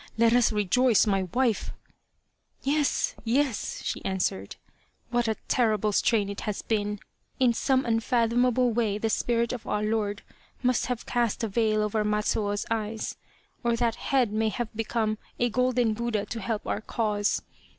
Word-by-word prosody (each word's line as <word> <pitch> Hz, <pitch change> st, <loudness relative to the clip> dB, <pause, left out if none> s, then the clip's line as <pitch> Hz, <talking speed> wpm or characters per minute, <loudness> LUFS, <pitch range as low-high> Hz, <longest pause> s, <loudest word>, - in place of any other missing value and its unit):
Let 230 Hz, 0 st, +4 dB
us 245 Hz, -1 st, +4 dB
rejoice, 215 Hz, +2 st, +3 dB
my 195 Hz, -3 st, +1 dB
wife! 245 Hz, -4 st, 0 dB, 0.3 s
" -, -, -48 dB
" -, -, -49 dB
Yes, 290 Hz, 0 st, +1 dB
yes," 245 Hz, 0 st, 0 dB
she -, -, -3 dB
answered, 180 Hz, -, -2 dB, 0.3 s
" -, -, -41 dB
what 240 Hz, -1 st, +1 dB
a 220 Hz, -, +1 dB
terrible 215 Hz, -4 st, +2 dB
strain 205 Hz, 0 st, +2 dB
it 200 Hz, 0 st, -5 dB
has 210 Hz, -2 st, -3 dB
been! 210 Hz, -2 st, -1 dB, 0.4 s
In 250 Hz, -2 st, +4 dB
some 260 Hz, +2 st, +1 dB
unfathomable 240 Hz, +1 st, +2 dB
way 215 Hz, -3 st, +1 dB
the 220 Hz, +1 st, -1 dB
spirit 235 Hz, +1 st, +1 dB
of 245 Hz, -, -7 dB
our 210 Hz, 0 st, 0 dB
lord 210 Hz, -1 st, -1 dB, 0.4 s
must 250 Hz, 0 st, +2 dB
have 250 Hz, -2 st, -3 dB
cast 240 Hz, -2 st, 0 dB
a -, -, +1 dB
veil 215 Hz, 0 st, +1 dB
over 210 Hz, 0 st, 0 dB
Matsuo's 210 Hz, -1 st, 0 dB
eyes, 220 Hz, -1 st, -2 dB, 0.5 s
or 235 Hz, -1 st, +2 dB
that 230 Hz, -1 st, +1 dB
head 250 Hz, -5 st, 0 dB
may 220 Hz, 0 st, +1 dB
have 225 Hz, +1 st, -4 dB
become 220 Hz, -1 st, -1 dB, 0.2 s
a 240 Hz, -1 st, +2 dB
golden 250 Hz, -2 st, +2 dB
Buddha 220 Hz, -2 st, -1 dB
to 225 Hz, +2 st, -5 dB
help 220 Hz, 0 st, -3 dB
our 210 Hz, -, -2 dB
cause. 210 Hz, -3 st, 0 dB
225 Hz, 165 wpm, -27 LUFS, 210-240 Hz, 0.5 s, Let